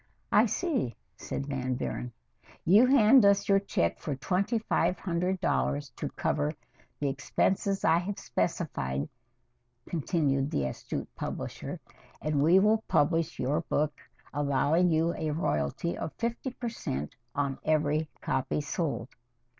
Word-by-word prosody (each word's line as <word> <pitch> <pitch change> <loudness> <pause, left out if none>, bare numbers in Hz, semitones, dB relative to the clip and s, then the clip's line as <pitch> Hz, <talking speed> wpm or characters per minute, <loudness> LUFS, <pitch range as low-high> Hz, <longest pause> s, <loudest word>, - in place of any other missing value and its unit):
"I - - +6
see," 275 - -1 0.2
said 140 - -4
Van 130 -2 -2
Buren. 125 0 -4 0.5
"You 210 +9 +7
hand 255 -2 +7
us 200 0 +4
your 195 -1 +5
check 85 - 0
for 145 - -3
twenty 190 - 0
five 215 -4 +1
hundred 180 +1 -1
dollars 65 +2 0
to - - -3
cover 150 0 -1 0.5
the 145 - 0
expenses 190 +8 0
I 165 +1 +5
have 195 +3 -4
specified," 70 - -2 0.8
continued 145 -4 0
the 70 - 0
astute 65 - -4
publisher, - - -5 0.4
"and 150 -2 0
we 165 +5 +6
will 215 +3 +4
publish 165 +2 +2
your 145 +5 0
book, 150 -2 0 0.4
allowing 145 +5 +2
you 165 +1 +2
a 155 - -2
royalty 150 - -1
of 160 - -5
fifty 235 +3 -2
per 245 -1 -5
cent 75 - -4 0.2
on 140 -2 -1
every 155 0 +1
copy 130 - -1
sold." 150 -4 -2
155 Hz, 135 wpm, -29 LUFS, 140-190 Hz, 0.8 s, You